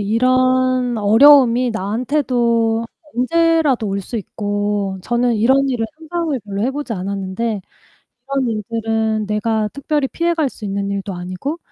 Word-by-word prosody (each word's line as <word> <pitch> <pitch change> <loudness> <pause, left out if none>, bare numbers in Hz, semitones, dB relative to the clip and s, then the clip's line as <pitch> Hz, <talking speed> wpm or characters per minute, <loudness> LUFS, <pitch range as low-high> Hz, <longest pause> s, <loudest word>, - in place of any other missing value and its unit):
이런 255 +2 +2
어려움이 245 +3 +6
나한테도 230 +1 0 0.3
언제라도 305 -3 +2
올 195 0 -2
수 230 +5 -6
있고 205 -1 -2
저는 240 +2 +1
이런 265 +6 +3
일을 240 -4 -1
상상을 325 -3 -2
별로 200 0 -4
해보지 270 0 -2
않았는데 195 +3 -3 0.7
'이런 275 -3 0
일들은 220 0 -1
내가 215 +1 0
특별히 280 0 -1
피해갈 335 -1 0
수 220 - -10
있는 200 0 -2
일도 200 0 -4
아니고 185 - -5
230 Hz, 290 characters per minute, -18 LUFS, 205-265 Hz, 0.7 s, 어려움이